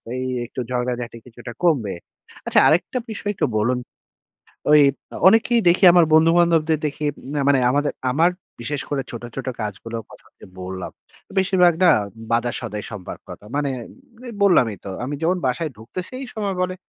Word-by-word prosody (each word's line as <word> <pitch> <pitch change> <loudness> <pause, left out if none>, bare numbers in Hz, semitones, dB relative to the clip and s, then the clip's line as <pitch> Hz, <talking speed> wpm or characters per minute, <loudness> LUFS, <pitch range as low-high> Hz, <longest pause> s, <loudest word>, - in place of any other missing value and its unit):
এই 130 - -3 0.2
একটু 125 - -8
ঝগড়াঝাটি 125 -1 -3
কিছুটা 120 0 -10
কমবে। 135 - +2 0.5
আচ্ছা, - - +4
আরেকটা 175 +10 +2
বিষয় 205 -1 -3
একটু - - +1
বলুন? 120 +4 +1 0.9
ঐ - - +6 0.6
অনেকেই 230 +3 +4
দেখি, 180 +3 +4
আমার 175 -1 +6
বন্ধু-বান্ধবদের 165 -1 +4
দেখি, 150 +1 -4 0.3
না 145 - 0
মানে 140 -2 +4
আমাদের, 145 +2 +1 0.2
আমার 165 +5 +4 0.3
বিশেষ 140 +4 -3
করে 140 -2 -1
ছোট, 120 - -7
ছোট 135 - -5
কাজগুলোর 110 +2 -5
কথা - - -16
যে - - -12 0.2
বললাম। 95 0 -6 0.5
বেশিরভাগ 185 -2 +4
না 175 - +7 0.4
বাজার-সদাই 115 -3 -2
সম্পর্কতা। 100 0 -9
মানে, 145 -1 0 0.6
এই - - -7
বললামই 125 - +4
তো, 100 - -6
আমি 140 +4 -4
যখন 180 +3 +1
বাসায় 150 +5 -1
ঢুকতেছি 150 - -7
এই 270 - -6
সময় 200 -4 -2
বলে, 185 0 -1
145 Hz, 155 wpm, -21 LUFS, 120-175 Hz, 0.9 s, না